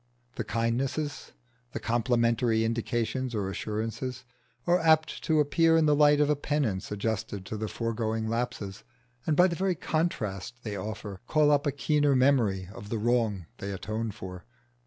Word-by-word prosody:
The - - -3
kindnesses, 135 +6 -2 0.4
the - - -3
complimentary 115 -1 +2
indications 115 +2 -1
or 100 -2 -1
assurances, 115 +5 -4 0.4
are 175 +1 +4
apt 160 -1 +3
to 155 -1 +3
appear 165 +3 +4
in 160 - +4
the 150 -1 +4
light 145 0 +5
of 150 - +4
a 150 - +3
penance 140 -10 -1
adjusted 105 -1 -3
to 110 - -5
the 110 +1 -3
foregoing 110 -1 -2
lapses, 115 -4 -3 0.4
and 155 -2 +2
by 180 - +7
the 175 -2 +1
very 185 +1 0
contrast 120 - -2
they 105 -2 -4
offer 105 0 -6
call 150 -1 +4
up 145 0 +3
a - - +2
keener 145 0 +2
memory 120 -9 +3
of 105 - -9
the 115 - -1
wrong 110 -5 +1
they 100 - -4
atone 110 +3 -3
for. 95 -4 -8
115 Hz, 160 wpm, -28 LUFS, 110-145 Hz, 0.4 s, by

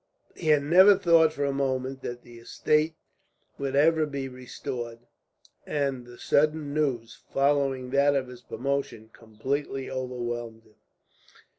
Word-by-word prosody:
He 165 - -6
had 150 -2 +4
never 185 +6 +7
thought 165 -4 +5
for 145 -2 -2
a 140 - 0
moment 135 -1 -2
that 120 -1 -6
the 120 -1 -13
estate 155 +6 0 0.6
would 135 -1 -2
ever 155 +2 +4
be 140 -2 -4
restored, 125 -2 -6 0.7
and 135 -4 -2
the 120 0 -13
sudden 150 +1 +1
news, 130 -7 -2
following 135 -2 +1
that 140 +1 +3
of 135 -2 0
his 125 -1 -11
promotion, 135 -5 -4
completely 130 +5 -4
overwhelmed 120 -3 -4
him. 110 - -25
135 Hz, 135 wpm, -27 LUFS, 125-145 Hz, 0.7 s, never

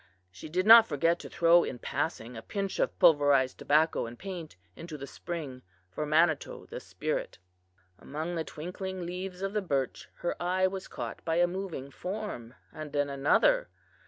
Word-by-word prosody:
She 95 +12 -10
did 185 +4 0
not 225 +1 +10
forget 165 +3 +1
to - - -9
throw 170 +1 +5
in 125 - -4
passing 120 -2 -3
a 110 - -7
pinch 195 - -4
of - - 0
pulverized 145 -6 +4
tobacco 155 -4 +2
and 120 +1 -10
paint 180 - -7 0.2
into 165 -2 -8
the 140 - -7
spring 145 -5 -6 0.3
for 150 +10 -3
Manitou, 155 0 +1
the - - -5
spirit. - - -4 0.6
"Among 155 +5 -5
the 165 -2 -1
twinkling 180 +4 -6
leaves 180 +1 -5
of 195 +1 -2
the 210 - 0
birch 140 -8 -2
her 175 - -3
eye 185 +2 +2
was 190 0 -3
caught 120 -4 -6
by 165 0 0
a 175 +1 +5
moving 175 -7 -5
form, 180 - -6 0.2
and 155 -2 -8
then 145 -1 0
another. 150 - +3
165 Hz, 170 wpm, -29 LUFS, 145-185 Hz, 0.6 s, not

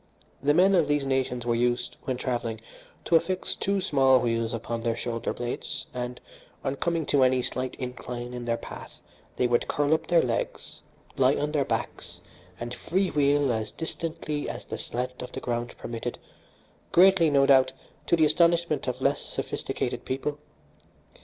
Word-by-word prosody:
The 145 +2 +3
men 190 +3 +5
of 170 -5 +4
these 145 -1 +1
nations 130 -2 0
were 120 - +2
used, 120 +1 0
when 130 -2 -1
travelling, 120 -3 -2 0.5
to 170 - +3
affix 185 +3 +1
two 200 0 0
small 135 -8 +4
wheels 115 -1 0
upon 115 0 -3
their 115 0 0
shoulder 115 -1 -3
blades, 120 0 -4
and 125 0 -4 0.4
on 135 +1 -2
coming 165 -1 0
to 140 - +3
any 130 -1 +3
slight 130 +1 -2
incline 125 -1 -6
in 120 -1 -5
their 115 0 0
path - - -10 0.3
they 125 - +1
would 120 0 +2
curl 145 +1 +2
up 160 - 0
their 170 -1 +4
legs, 115 -2 -3 0.4
lie 135 +1 +4
on 150 +1 -1
their 145 -3 +1
backs - - -3 0.4
and 120 +1 -5
free 185 +8 0
wheel 145 -2 +3
as 110 -1 -3
distantly 160 -2 -3
as - - -6
the - - -5
slant 125 +1 -4
of 125 0 -7
the - - -4
ground 120 0 -3
permitted, 120 +1 -5 0.7
greatly, 180 -2 +6
no 140 -1 +4
doubt, 130 -1 +5 0.4
to - - +4
the 160 -2 +4
astonishment 170 -2 +3
of 125 +1 -2
less 140 +2 +2
sophisticated - - -3
people. 145 +3 -3
130 Hz, 170 wpm, -27 LUFS, 120-150 Hz, 0.7 s, greatly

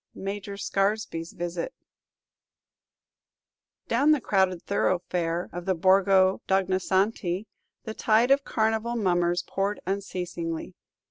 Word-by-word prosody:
MAJOR 200 0 -5
SCARESBY'S 195 -4 -1
VISIT 175 0 -4 2.1
Down 265 +6 +2
the 300 - +1
crowded 190 -6 +1
thoroughfare 175 -3 -1
of 175 0 -6
the 190 -1 +1
Borgo 190 +1 +4
d' - - -6
Ognisanti 190 0 +1 0.4
the 220 - -5
tide 225 +4 +3
of 275 0 +4
Carnival 220 +1 0
mummers 175 -4 +1
poured 200 +2 -2
unceasingly. 180 -3 -4
190 Hz, 105 wpm, -26 LUFS, 175-210 Hz, 2.1 s, Borgo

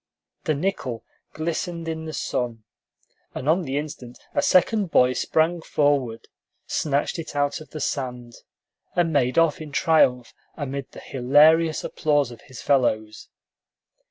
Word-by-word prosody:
The 155 - +1
nickel 140 -8 -3 0.3
glistened 165 +1 -3
in 160 0 -4
the 160 - -5
sun, 120 -5 -3 0.7
and 130 - -5
on 165 +4 +3
the 140 -4 -3
instant 130 -5 -6 0.2
a - - +2
second 200 +2 +3
boy 125 -4 +4
sprang 160 +5 +1
forward, 140 -8 0 0.4
snatched 145 +2 -1
it 160 - -7
out 145 +1 0
of 155 - -12
the 155 - -7
sand, 125 -4 -3 0.6
and 170 -2 +2
made 130 -1 +1
off 165 -2 +3
in 155 -2 -8
triumph 135 -6 +2 0.2
amid 140 -2 -4
the - - -10
hilarious 155 +5 +4
applause 145 -4 +1
of 120 - -12
his 130 -4 -11
fellows. 110 -6 0
145 Hz, 140 wpm, -24 LUFS, 125-160 Hz, 0.7 s, boy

